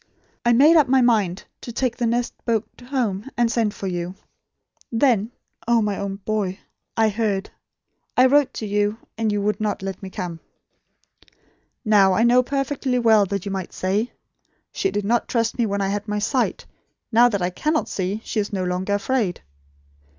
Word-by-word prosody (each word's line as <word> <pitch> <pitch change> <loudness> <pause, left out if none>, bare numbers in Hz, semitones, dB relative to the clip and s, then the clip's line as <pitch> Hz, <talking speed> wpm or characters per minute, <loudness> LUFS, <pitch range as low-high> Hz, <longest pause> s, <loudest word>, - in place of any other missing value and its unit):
I 240 - +3
made 295 +8 +6
up 300 -3 +5
my 260 +1 +4
mind 210 -6 +2 0.2
to 235 - -7
take 240 0 -1
the 240 -2 -1
next 240 +1 0
boat 230 -3 0 0.2
home, 240 -4 -2
and 240 -1 +2
send 225 -3 +1
for - - -6
you. 175 0 -3 0.8
Then 230 -3 +2 0.4
oh, 235 -1 +4
my 205 -1 0
own 200 -1 -3
boy 195 -2 -2 0.4
I 220 -1 +4
heard. 205 -2 -1 0.7
I 255 - +7
wrote 275 0 +4
to 220 - -4
you; 205 +1 0 0.2
and 220 -1 0
you 205 -1 -1
would 210 +1 -1
not 210 -2 -2
let 195 -1 -5
me 190 - -7
come." 180 -4 -5 1.5
"Now 200 -3 +5
I 220 - +2
know 245 +1 +5
perfectly 275 -1 -1
well, 220 -4 +4
that 200 0 -3
you 200 - -3
might 190 -2 -4
say: 205 +6 -1 0.6
'She 390 - 0
did 205 - -2
not 235 +3 +1
trust 230 0 -1
me 235 - +2
when 200 0 -1
I 195 - 0
had 205 +1 -3
my 210 0 -1
sight. 245 +5 0 0.5
Now 240 +2 +6
that 200 -5 -1
I 180 - 0
cannot 305 - 0
see, 195 +3 -3
she 220 - -2
is 205 - -2
no 190 -2 -2
longer 185 +2 -1
afraid.' 205 -3 -1
215 Hz, 185 wpm, -22 LUFS, 195-240 Hz, 1.5 s, I